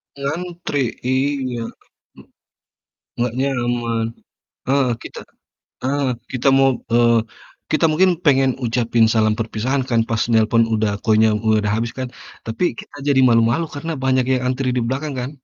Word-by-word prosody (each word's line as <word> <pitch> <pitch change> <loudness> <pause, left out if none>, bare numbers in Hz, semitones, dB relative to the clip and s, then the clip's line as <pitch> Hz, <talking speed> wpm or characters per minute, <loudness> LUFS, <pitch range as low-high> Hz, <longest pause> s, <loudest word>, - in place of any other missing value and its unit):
Ngantri, 160 +2 -4 0.3
iya. 130 -2 0 0.6
M - - -13 1.0
nggak 120 -1 0
nyaman, 120 -4 -1 0.6
heeh, 135 -1 +2
kita - - -9 0.6
heeh, 140 +1 0 0.3
kita 130 +2 +1
mau 135 0 +5 0.2
eee, 115 -1 +4 0.5
kita 155 +1 +2
mungkin 185 +4 +4
pengen 135 -2 +4
ucapin 120 -1 +2
salam 110 -1 +3
perpisahan 115 +5 -1
kan 115 -1 +3
pas 115 -1 -1
nelepon 115 +1 +4
udah 110 -1 +1
koinnya 110 0 +4 0.2
udah 105 -1 +2
mau 105 - +1
habis 115 +1 -2
kan. 130 -1 -3 0.4
Tapi 115 +10 -2 0.2
kita - - -15
jadi 135 -2 +4
malu-malu 115 +7 +3
karena 165 +3 -4
banyak 130 -1 +2
yang 125 - -3
antri 130 +1 -1
di 125 - +1
belakang 140 +3 -3
kan? 125 +3 -4
125 Hz, 145 wpm, -20 LUFS, 115-140 Hz, 1.0 s, mau